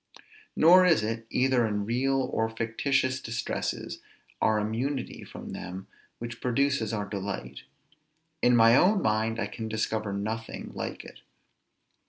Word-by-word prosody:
Nor 180 Hz, +3 st, +7 dB
is 165 Hz, -11 st, +4 dB
it, 115 Hz, +1 st, -3 dB
either 130 Hz, -1 st, +2 dB
in 105 Hz, -1 st, -2 dB
real 135 Hz, +4 st, +1 dB
or 110 Hz, 0 st, +1 dB
fictitious 130 Hz, +4 st, 0 dB
distresses, 115 Hz, 0 st, -3 dB, 0.4 s
our 110 Hz, -1 st, +3 dB
immunity 120 Hz, +6 st, -2 dB
from -, -, -9 dB
them 95 Hz, +2 st, -7 dB, 0.3 s
which 120 Hz, 0 st, -7 dB
produces 130 Hz, -2 st, +1 dB
our 105 Hz, -2 st, -2 dB
delight; 95 Hz, -, -5 dB, 0.8 s
in 125 Hz, 0 st, +5 dB
my 115 Hz, 0 st, +7 dB
own 190 Hz, +6 st, +4 dB
mind 110 Hz, +1 st, +1 dB
I 110 Hz, -, 0 dB
can 110 Hz, +2 st, -6 dB
discover 110 Hz, -1 st, -1 dB
nothing 110 Hz, +3 st, -4 dB
like -, -, -5 dB
it. -, -, -12 dB
115 Hz, 135 wpm, -28 LUFS, 110-130 Hz, 0.8 s, Nor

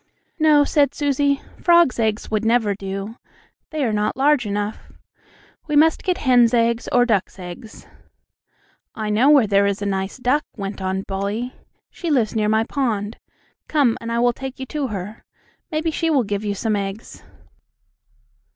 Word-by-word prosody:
"No," 305 Hz, -2 st, +5 dB
said 285 Hz, -2 st, +1 dB
Susie, 280 Hz, -1 st, 0 dB, 0.2 s
"frogs' 340 Hz, -8 st, +4 dB
eggs 220 Hz, -1 st, -1 dB
would 215 Hz, 0 st, 0 dB
never 225 Hz, -2 st, +2 dB
do. 195 Hz, +3 st, -6 dB, 0.5 s
They 310 Hz, -2 st, -2 dB
are 225 Hz, -, 0 dB
not 210 Hz, +2 st, -1 dB
large 275 Hz, -4 st, +3 dB
enough. 205 Hz, +1 st, -4 dB, 0.8 s
We 300 Hz, -, -1 dB
must 315 Hz, +2 st, +4 dB
get 365 Hz, -1 st, 0 dB
hens' 245 Hz, -5 st, +4 dB
eggs 235 Hz, 0 st, +1 dB
or 245 Hz, 0 st, +4 dB
ducks' 210 Hz, -6 st, 0 dB
eggs." 180 Hz, +4 st, -10 dB, 1.1 s
"I 215 Hz, -1 st, -3 dB
know 235 Hz, +7 st, +4 dB
where 285 Hz, -6 st, +6 dB
there 200 Hz, -1 st, +3 dB
is 200 Hz, 0 st, -1 dB
a 205 Hz, -, -4 dB
nice 195 Hz, +1 st, -2 dB
duck," 260 Hz, +4 st, +1 dB
went 195 Hz, -1 st, -5 dB
on 190 Hz, 0 st, -2 dB
Bully. 200 Hz, +6 st, -3 dB, 0.4 s
"She 345 Hz, -, -5 dB
lives 240 Hz, -7 st, +1 dB
near 210 Hz, -1 st, +1 dB
my 220 Hz, +1 st, +3 dB
pond. 225 Hz, -5 st, -2 dB, 0.5 s
Come, 280 Hz, -7 st, +2 dB
and 230 Hz, 0 st, -5 dB
I 235 Hz, -, 0 dB
will 240 Hz, 0 st, +3 dB
take 265 Hz, +2 st, -7 dB
you 265 Hz, -, -4 dB
to 285 Hz, +1 st, -3 dB
her. 205 Hz, 0 st, -7 dB, 0.5 s
Maybe 315 Hz, +1 st, -1 dB
she 330 Hz, +1 st, -1 dB
will 280 Hz, -5 st, +3 dB
give 205 Hz, -1 st, -3 dB
you 205 Hz, -1 st, -2 dB
some 215 Hz, +1 st, -1 dB
eggs." 200 Hz, +1 st, -5 dB
230 Hz, 170 wpm, -21 LUFS, 205-280 Hz, 1.1 s, where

